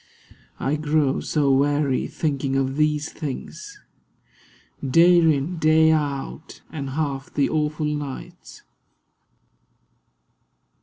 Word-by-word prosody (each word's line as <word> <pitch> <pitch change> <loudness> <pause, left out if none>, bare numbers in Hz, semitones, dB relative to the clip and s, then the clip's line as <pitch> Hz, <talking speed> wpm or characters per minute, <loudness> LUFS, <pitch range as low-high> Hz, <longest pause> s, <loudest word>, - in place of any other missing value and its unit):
I 145 +3 0
grow 150 -2 +1
so 145 -3 +1
weary 140 0 +1
thinking 140 -3 -2
of 135 0 0
these 150 0 +1
things; 410 - -7 1.0
Day 170 +6 +5
in, 160 +1 +1
day 160 0 +5
out; 145 0 -3
and 140 -4 -5
half 140 -3 -3
the 140 - +1
awful 155 0 -1
nights. 145 -2 -6
150 Hz, 95 wpm, -23 LUFS, 140-155 Hz, 1.0 s, Day